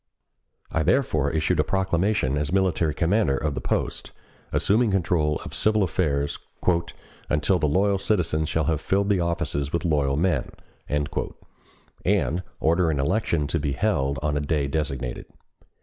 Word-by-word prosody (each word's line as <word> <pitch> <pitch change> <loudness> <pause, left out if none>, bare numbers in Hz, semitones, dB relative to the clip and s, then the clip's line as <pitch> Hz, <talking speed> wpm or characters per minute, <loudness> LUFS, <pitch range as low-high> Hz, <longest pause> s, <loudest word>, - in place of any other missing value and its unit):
I 80 - +1
therefore 80 - +2
issued 80 +1 0
a - - +5
proclamation 95 -6 +1
as 75 +1 -1
military 90 -5 +1
commander 85 -4 +2
of 75 0 -1
the - - -4
post, - - -2 0.4
assuming 110 +3 +2
control 85 -6 +1
of - - -7
the - - -8
civil 110 -1 +2
affairs 75 -5 0 0.9
"until 75 +5 +2
the 75 - +2
loyal 100 +5 +2
citizens 80 -7 0
shall 80 +1 0
have 80 -1 0
filled 100 +4 +1
the 100 -3 +3
offices 85 -5 -1
with 85 +1 -1
loyal 70 -4 +1
men," 80 -5 0 0.4
and 75 0 0 1.5
ordering 80 -2 +2
an 70 - +1
election 85 -4 0
to 80 +3 -1
be 70 -1 -1
held 70 -6 0
on 75 -1 0
a - - +1
day 75 -1 0
designated. 70 -4 -3
80 Hz, 150 wpm, -25 LUFS, 75-95 Hz, 1.5 s, a